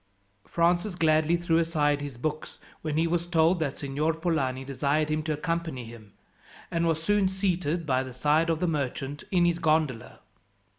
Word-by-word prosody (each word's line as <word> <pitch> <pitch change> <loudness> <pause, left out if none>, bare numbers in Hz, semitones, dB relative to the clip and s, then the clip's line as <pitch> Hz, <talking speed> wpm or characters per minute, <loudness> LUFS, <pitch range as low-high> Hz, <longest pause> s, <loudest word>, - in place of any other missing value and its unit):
Francis 175 +3 +1
gladly 160 0 +3
threw 170 -1 +1
aside 150 -3 +1
his 140 -4 -6
books 155 +4 -4 0.2
when 155 -1 -2
he 165 - +3
was 170 +1 -1
told 170 +1 +3
that 145 -3 -2
Signor 150 +3 -1
Polani 140 -6 -1
desired 145 +3 0
him 155 0 0
to 155 0 -2
accompany 165 -4 -3
him, 110 -3 -13 0.6
and 170 0 +1
was 160 -1 0
soon 205 +1 +3
seated 180 -4 -1
by 130 -3 +1
the 130 -1 -6
side 150 +6 +2
of 160 -1 +1
the 180 - 0
merchant 145 -2 -3
in 175 -2 +3
his 170 0 +1
gondola. 155 -7 0
155 Hz, 175 wpm, -27 LUFS, 145-170 Hz, 0.6 s, gladly